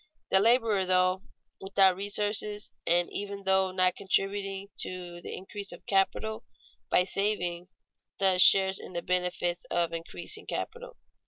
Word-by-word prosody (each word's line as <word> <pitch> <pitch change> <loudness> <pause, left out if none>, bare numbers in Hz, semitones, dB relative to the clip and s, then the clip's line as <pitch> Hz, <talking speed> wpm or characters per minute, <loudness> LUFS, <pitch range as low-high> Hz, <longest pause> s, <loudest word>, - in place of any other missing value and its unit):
The 190 - +7
laborer, 225 -2 +3
though 185 0 +2 0.4
without 195 -1 +3
resources 205 +1 0 0.2
and 175 +1 +3
even 200 0 -5
though 190 0 +2
not 185 0 +2
contributing 195 0 -2
to 175 -1 -5
the - - -7
increase 200 +1 -7
of 175 - -12
capital 220 +3 0 0.5
by 180 - +4
saving, 180 -3 -1 0.5
thus 190 -2 +4
shares 190 0 +6
in - - -10
the 170 - -4
benefit 180 -1 -1
of 170 -1 0
increasing 165 0 -6
capital. - - -6
190 Hz, 135 wpm, -28 LUFS, 180-200 Hz, 0.5 s, The